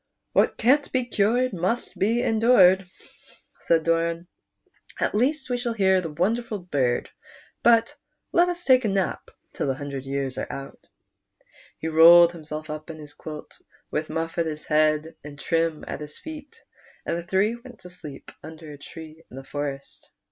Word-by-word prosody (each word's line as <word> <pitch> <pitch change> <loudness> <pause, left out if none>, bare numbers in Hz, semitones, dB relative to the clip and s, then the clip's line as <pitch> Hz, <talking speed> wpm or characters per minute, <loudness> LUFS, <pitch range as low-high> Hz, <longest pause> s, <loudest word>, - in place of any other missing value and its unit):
" - - -54
What - - +3
can't 280 +5 +3
be 255 -2 0
cured 240 +2 +1
must 185 +7 -2
be 230 +5 +1
endured," 200 -5 +5 0.7
said 165 -1 +2
Dor.m; 165 +1 0 0.4
" - - -23
at - - 0
least 265 +6 +1
we 245 - 0
shall 240 -1 -2
hear 190 -3 +3
the 165 - -5
wonderful 215 +8 -1
bird; 140 -10 -1 0.5
but 235 +5 +4 0.4
let 350 +1 +4
us 355 0 -4
take 255 -1 +5
a - - +1
nap 195 -2 -1 0.2
till - - -2
the 135 - 0
hundred 140 -1 -6
years 135 -1 -3
are - - -4
out," 135 0 -9 0.9
He 160 - -5
rolled 170 +2 +8
himself 155 -2 -7
up 155 +1 -7
in 160 - -7
his 150 -1 -10
quilt, 155 -1 -10 0.3
with 155 +1 -2
Muff 165 +1 -3
at 165 - +1
his 155 -1 -6
head 155 +1 +2
and 145 -1 -10
Trim 165 -1 -1
at - - -5
his 150 0 -8
feet, 315 +8 -10 0.4
and - - -1
the 170 - -3
three 195 +6 +1
went 240 0 -13
to 180 - -10
sleep 150 -6 -10
under 160 0 -10
a 145 - -11
tree 160 +1 -11
in 125 - -11
a 135 - -7
forest. 140 0 -6
170 Hz, 175 wpm, -25 LUFS, 155-230 Hz, 0.9 s, rolled